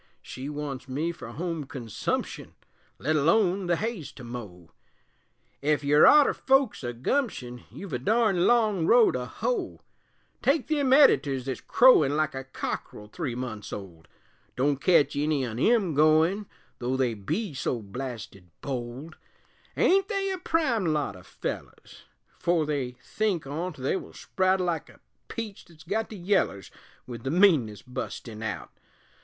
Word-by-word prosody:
She 130 +2 -7
wants 145 -2 -5
me 155 +6 -1
fer 170 - -10
home 165 -2 -4
consumption, 125 -5 -4 0.4
Let 155 +4 0
alone 180 +5 +2
the 175 - +3
hay's 210 - -4
to 125 - -11
mow 105 -8 -9 0.9
Ef 150 +1 +1
you're 145 +1 +6
arter 295 -2 +7
folks 270 - +2
o' 120 - -2
gumption, 125 - -2
You've 195 -6 -9
a 125 - -1
darned 210 - +2
long 215 -8 +3
row 235 -1 +6
to 125 -1 -3
hoe. 415 - -3 0.6
Take 290 +4 +1
them 285 -4 +1
editors 145 - +5
thet's 130 -3 -4
crowin' 155 - +5
Like 155 -1 0
a 135 0 -5
cockerel 105 -5 -6
three 140 -3 -4
months 110 -4 -6
old 85 -6 -9 0.5
Don't 140 +1 +1
ketch 145 -3 +4
any 145 -2 +1
on 115 -1 -5
'em 210 - +3
goin', 160 +7 +3 0.3
Though 125 +2 -1
they 125 -3 +1
be 155 - -3
so 130 -2 -2
blasted 110 -4 -7
bold; 130 +3 -5 0.6
Ain't 390 +1 +4
they 390 -2 -1
a 375 - -3
prime 265 - +1
lot 150 -9 0
o' 90 - -12
fellers? - - -7 0.3
'Fore 170 -2 +2
they 140 -4 -2
think 195 - -1
on't 160 +4 -4
they 130 +5 -1
will - - -6
sprout 190 0 0
(Like 175 -3 -2
a - - -18 0.3
peach 220 -4 -6
thet's 160 -2 -17
got 220 +5 -2
the 215 - -8
yellers), 175 - 0 0.3
With 120 -2 -8
the 135 - -3
meanness 150 - +3
bustin' 125 -3 -6
out. 100 -7 -4
150 Hz, 150 wpm, -27 LUFS, 125-200 Hz, 0.9 s, arter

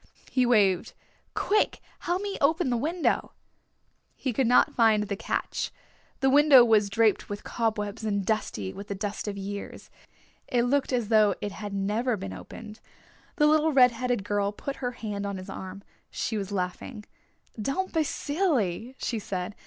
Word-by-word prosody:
He 255 -2 +2
waved. 200 -7 +3 0.4
"Quick, 420 +1 +1 0.2
help 360 +3 -1
me 405 -1 -3
open 290 -1 +2
the - - +2
window." 315 +8 0 0.8
He 260 - -3
could 255 +2 +1
not 245 - +4
find 220 -3 +4
the 200 -1 -3
catch. 195 - -2 0.5
The 265 - +4
window 285 -3 +8
was 215 -3 +3
draped 220 +1 +2
with 205 0 -5
cobwebs 215 -2 -2
and 200 -3 -1
dusty 110 - -2
with 200 - -9
the 200 - -4
dust 205 +1 -4
of 200 -1 -3
years. 200 +1 -7 0.6
It 240 -1 +1
looked 275 +3 +1
as 240 -4 0
though 215 -3 +4
it 205 - -4
had 205 +1 -7
never 215 +5 0
been 95 - -6
opened. 210 - -10 0.6
The 300 -4 +3
little 310 +1 +4
red 250 -2 +7
headed 245 -2 -2
girl 205 -1 0
put 275 +6 -6
her 250 -1 -3
hand 205 -4 -4
on 200 -1 -4
his 185 +1 -8
arm. 190 +1 -8 0.3
She 225 - -3
was 200 -2 -3
laughing. 200 +4 -4 0.6
"Don't 370 - -2
be 325 - +2
silly," 270 - -1
she 230 - -2
said. 185 -1 -4
220 Hz, 170 wpm, -27 LUFS, 200-260 Hz, 0.8 s, window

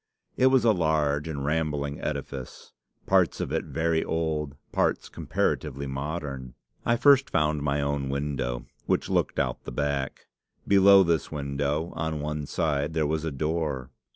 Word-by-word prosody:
It 130 - +4
was 130 -2 +4
a 115 - +6
large 80 -4 +1
and 70 -3 -4
rambling 75 -2 -1
edifice, 70 -3 -5 0.3
parts - - +3
of - - -3
it - - -1
very 80 0 0
old, 80 -3 -2 0.2
parts - - +1
comparatively 70 +2 -1
modern. 70 -2 -5 0.3
I 120 - +2
first 140 +1 +5
found 75 -2 +1
my 70 0 0
own 70 -1 -1
window, 70 -3 -2 0.2
which - - +1
looked - - +1
out - - 0
of - - -42
the - - -5
back. 70 -2 -2 0.4
Below 100 0 +7
this 85 -2 0
window, 75 +2 -2
on 80 -1 -2
one 75 0 -3
side, 75 +3 -1
there 80 -2 +2
was 80 +1 -1
a 80 - -2
door. 75 -3 -2
75 Hz, 155 wpm, -27 LUFS, 70-80 Hz, 0.4 s, Below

